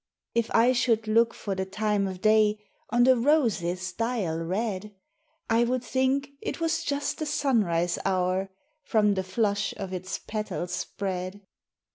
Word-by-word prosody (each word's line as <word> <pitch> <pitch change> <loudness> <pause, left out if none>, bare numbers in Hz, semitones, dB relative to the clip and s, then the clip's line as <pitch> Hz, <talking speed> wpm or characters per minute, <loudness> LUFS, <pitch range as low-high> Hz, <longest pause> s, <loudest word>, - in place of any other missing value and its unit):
IF 235 -1 +1
I 235 +2 +6
should 230 -3 +1
look 230 +2 +4
for 200 - -4
the 190 0 -2
time 205 +1 0
o' 190 - -4
day 215 +2 +3 0.3
On 240 +2 +3
the 260 +1 +6
rose's 205 - +1
dial 220 -7 -1
red, 200 +3 -3 0.5
I 230 0 +3
would 250 +1 0
think 265 +2 0
it - - -4
was 330 0 0
just 285 -2 -2
the 310 - -2
sunrise 215 - +1
hour, 185 0 0 0.3
From 210 -3 +3
the 190 -1 -1
flush 200 +1 0
of 190 -2 -5
its 185 +1 -4
petals 210 -5 -4
spread. 185 +2 -4
210 Hz, 150 wpm, -27 LUFS, 190-240 Hz, 0.5 s, I